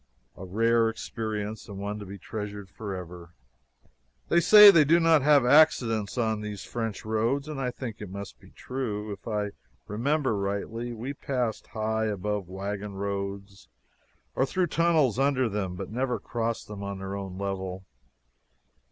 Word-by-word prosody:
A - - -10
rare 115 +4 +2
experience 110 -1 -5
and 100 - -7
one 100 +1 -4
to 105 - -8
be 100 +1 -8
treasured 105 -1 -6
forever. 90 -5 -7 0.9
They 170 - +5
say 210 +3 +10
they 165 -5 +6
do 165 +4 +4
not 165 -2 +5
have 145 -2 +5
accidents 125 -7 +4
on 110 -3 0
these 105 -2 -6
French 115 -4 -4
roads, 115 +6 0
and 150 -3 -4
I 125 - 0
think 120 -3 -6
it 105 - -6
must 95 -10 -8
be - - -17
true. 110 -5 -4
If 100 - -12
I 105 -2 -1 0.3
remember 130 +4 0
rightly, 100 +4 -3
we 120 +4 -5
passed 125 -5 -3
high 110 0 -1
above 105 -2 -2
wagon 100 +2 -5
roads 100 -4 -5 0.6
or - - +1
through 185 +4 +1
tunnels 155 -8 +3
under 135 -2 +2
them, 100 -4 -3
but 90 - -6
never 125 +2 -1
crossed 115 -1 -3
them 105 -1 -8
on 100 0 -4
their 95 +1 -5
own 95 -2 -6
level. 95 -1 -4
110 Hz, 160 wpm, -27 LUFS, 100-125 Hz, 0.9 s, say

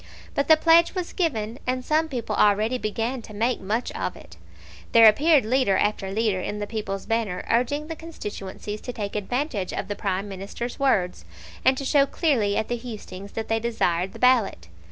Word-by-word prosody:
But 280 - 0
the 315 - +7
pledge 330 +3 +5
was 365 -2 -3
given, 235 - -1
and 255 0 -1
some 315 +1 +2
people 245 -5 -3
already 215 +4 +3
began 230 +4 -2
to 215 -1 -12
make 235 +3 0
much 215 +5 -2
of - - -3
it. - - -14 0.6
There 230 -1 +9
appeared 290 +4 +5
leader 240 -5 +2
after 205 -2 0
leader 210 -2 0
in 205 - -4
the 205 - -3
People's 205 -3 -4
Banner 220 -5 -1
urging 250 +6 +1
the 325 +1 -6
constituencies 210 - -7
to 250 - -6
take 205 -3 -5
advantage 210 -1 -2
of - - -4
the 205 - -2
Prime 195 0 -2
Minister's 200 +6 -6
words, 190 - +1 0.4
and 260 0 +4
to 275 - -4
show 280 0 +4
clearly 240 - +1
at 220 - -1
the 240 - -2
hustings 205 -5 -9
that 225 - -4
they 225 0 +1
desired 190 -6 0
the - - -9
ballot. 230 - +2
225 Hz, 190 wpm, -24 LUFS, 205-260 Hz, 0.6 s, There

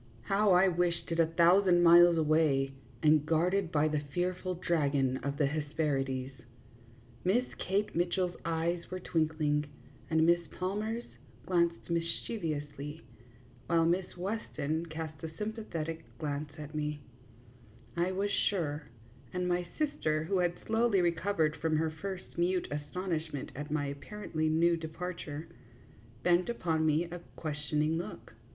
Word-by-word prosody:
How 200 0 +3
I 185 +2 +6
wished 175 -1 0
it 165 - 0
a 165 - +5
thousand 175 +2 +5
miles 170 0 +8
away, 150 -4 +3 0.3
and 155 -1 +5
guarded 170 +3 +1
by 150 -1 +3
the 150 -1 0
fearful 180 +5 -2
dragon 145 -7 +1
of 140 +1 -3
the 150 - +3
Hesperides! 140 -3 -1 0.9
Miss 225 +8 +3
Kate 200 +3 0
Mitchell's 175 +1 +1
eyes 170 +1 -1
were 185 - -4
twinkling, 155 -3 +1 0.4
and 160 0 +4
Miss 170 +1 +5 0.2
Palmer's 215 +5 -2 0.4
glanced 170 -2 +1
mischievously, 160 -4 -3 0.6
while 165 -1 +3
Miss 180 +2 0
Weston 170 -5 -2
cast 160 -1 -6
a 160 0 -6
sympathetic 180 -7 -4
glance 150 -1 -3
at 150 0 -8
me, 150 -1 -2 0.9
I 175 +2 +1
was 200 +2 -1
sure, 155 -8 0 0.4
and 180 0 -1
my 175 0 0
sister, 155 - 0
who 185 +3 0
had 175 -1 +1
slowly 225 -2 +3
recovered 170 -2 +1
from 155 +1 +1
her 160 0 +1
first 185 +2 -6
mute 180 +1 +1
astonishment 155 -1 -3
at 145 +3 -5
my 150 -1 0
apparently 155 +2 -3
new 170 +2 +3
departure, 160 -1 -5 0.8
bent 175 +3 +3
upon 160 -8 0
me 155 +2 +3
a 175 +1 -7 0.2
questioning 150 +1 -1
look. 175 - -8
165 Hz, 130 wpm, -32 LUFS, 155-180 Hz, 0.9 s, miles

